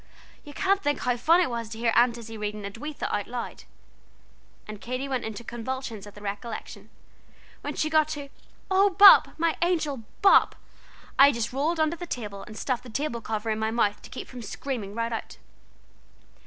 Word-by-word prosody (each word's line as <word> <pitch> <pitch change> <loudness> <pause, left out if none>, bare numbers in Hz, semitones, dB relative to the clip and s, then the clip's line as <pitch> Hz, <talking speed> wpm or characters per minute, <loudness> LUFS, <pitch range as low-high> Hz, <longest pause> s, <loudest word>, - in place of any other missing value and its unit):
You 295 - -11
can't 390 +5 +1
think 290 -4 0
how 250 -1 +1
funny 330 +9 +4
it - - -1
was 230 -2 -4
to 220 - -7
hear 230 0 +1
Aunt 240 0 +4
Izzie 225 -1 -9
reading 210 -1 -4
'Edwitha' 230 +10 -5
out 205 -1 -1
loud 245 0 -6 0.5
" - - -32
and 215 -1 -8
Katy 255 +3 -4
went 260 -3 -2
into 220 +1 -6
convulsions 235 -2 -5
at 205 - -13
the 205 - -12
recollection 205 +3 -6 0.7
"where - - -5
she 310 - 0
got 310 -1 +3
to 290 -2 -6 0.4
'Oh 390 +2 +5
Bop 395 +1 +8
my 330 0 +1
angel 325 -5 +1 0.3
Bop 390 - +6 0.3
' - - -24
I 280 +1 +9
just 235 -1 -3
rolled 310 +5 0
under 315 +1 +2
the 350 - -7
table, 210 -8 -5
and 215 - -11
stuffed 255 -3 -1
the 250 - -12
table 235 -1 -3
cover 220 0 -3
in 215 - -1
my 220 0 0
mouth 215 -3 0
to - - -12
keep - - -7
from 250 -1 -9
screaming 220 -2 -5
right 230 0 -2
out. 225 - -6
245 Hz, 195 wpm, -26 LUFS, 220-300 Hz, 0.7 s, I